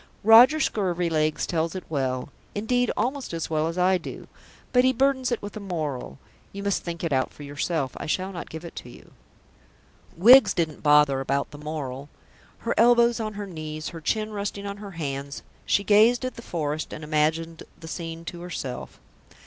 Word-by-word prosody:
Roger 235 +8 +8
Scurvilegs 170 - 0
tells 165 +1 -1
it 185 - -5
well 130 -4 -2 0.3
indeed, 245 +4 +1
almost 255 0 -2
as 165 0 -4
well 155 0 +1
as 165 +2 -4
I 180 +1 +3
do - - -9 0.5
but 250 0 +5
he 260 0 +4
burdens 260 0 +1
it 240 - -2
with 205 - -7
a - - -5
moral. 155 - -4 0.3
You 200 0 -7
must 200 -1 0
think 170 -1 -6
it 165 -4 0
out 130 -1 +1
for 145 - -12
yourself; 145 -1 -2
I - - -6
shall 185 +4 -1
not 175 -3 -7
give 160 +2 -8
it 170 - -9
to - - -8
you. - - -15 1.1
Wiggs 220 +2 +8
didn't 160 -3 -1
bother 150 -2 +5
about 140 +1 -1
the 145 - -10
moral. 145 -2 -5 0.5
Her 235 - -2
elbows 235 0 +5
on 215 -1 -3
her 205 0 -5
knees, 155 -4 -6
her 165 -2 -9
chin 215 +7 -1
resting 200 0 -4
on 200 0 -5
her 200 -2 -9
hands, 140 -2 -4 0.2
she 200 - +2
gazed 220 +5 +4
at 255 - -3
the - - -10
forest 155 -6 -3
and 155 - -7
imagined 160 +2 0 0.2
the 160 - -10
scene 165 0 -6
to 170 0 -7
herself. 170 -8 -6
170 Hz, 190 wpm, -25 LUFS, 155-210 Hz, 1.1 s, Roger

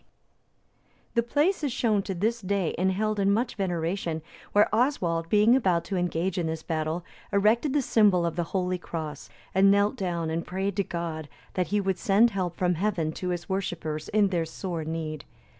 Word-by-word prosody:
D.] - - -37 1.1
The 235 - +3
place 300 +9 +1
is 285 - 0
shown 225 -5 +1
to 190 -1 -4
this 225 +6 0
day, 195 -3 0
and 190 +2 +1
held 215 +2 -1
in 200 0 +3
much 230 +5 +1
veneration, 170 -3 -2 0.3
where 205 +1 +5
Oswald, 175 - +1
being 210 +5 +5
about 185 -10 +2
to 195 - -3
engage 180 +1 -1
in 170 - -1
this 160 0 -4
battle, 160 +1 -2 0.3
erected 220 +7 +3
the 290 -2 +2
symbol 205 -7 +4
of 165 -2 -2
the 175 -1 -1
Holy 180 0 -1
Cross, 150 -9 -6 0.2
and 195 +1 +5
knelt 200 +1 +3
down 170 -4 -2
and 165 +1 -1
prayed 190 +1 -2
to 200 - +3
God 165 -4 -4 0.2
that 180 -1 0
he 210 - +1
would 190 -2 -1
send 220 +4 +4
help 180 -4 -2
from 180 -1 +2
Heaven 175 -3 0
to 180 +3 -4
his 175 -2 -3
worshippers 165 -5 -3
in 210 -2 +3
their 175 -3 0
sore 170 0 -4
need. 155 -1 -4
185 Hz, 190 wpm, -27 LUFS, 165-205 Hz, 1.1 s, where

